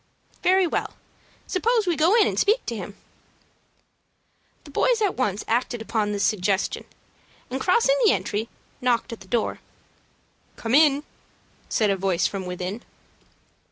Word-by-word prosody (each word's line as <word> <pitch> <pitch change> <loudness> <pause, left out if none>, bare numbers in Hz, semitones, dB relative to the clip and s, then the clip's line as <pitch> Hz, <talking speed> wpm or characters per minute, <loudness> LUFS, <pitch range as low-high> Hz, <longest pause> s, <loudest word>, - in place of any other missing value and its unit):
"Very 375 +1 +4
well; 335 - -2 0.5
suppose 450 +3 +1
we 350 -2 +1
go 325 +7 +4
in 415 - +6
and - - -1
speak 430 +4 +2
to 235 - -3
him." 200 0 -7 1.7
The 290 - -13
boys - - +2
at 410 -3 +1
once 210 -6 -1
acted 240 +1 0
upon 220 -1 -1
this 205 -1 -1
suggestion, 200 -1 0 0.7
and, 265 +1 -3
crossing 470 +6 +3
the 435 - +6
entry, 220 +3 -2 0.3
knocked 245 -1 0
at 230 - -8
the 190 - -14
door. 225 +3 -1 1.0
"Come 225 +1 -4
in!" 290 0 +5 0.7
said 210 -2 +2
a 195 - 0
voice 185 -2 0
from 190 -2 -3
within. 180 +5 -4
240 Hz, 145 wpm, -24 LUFS, -, 1.7 s, in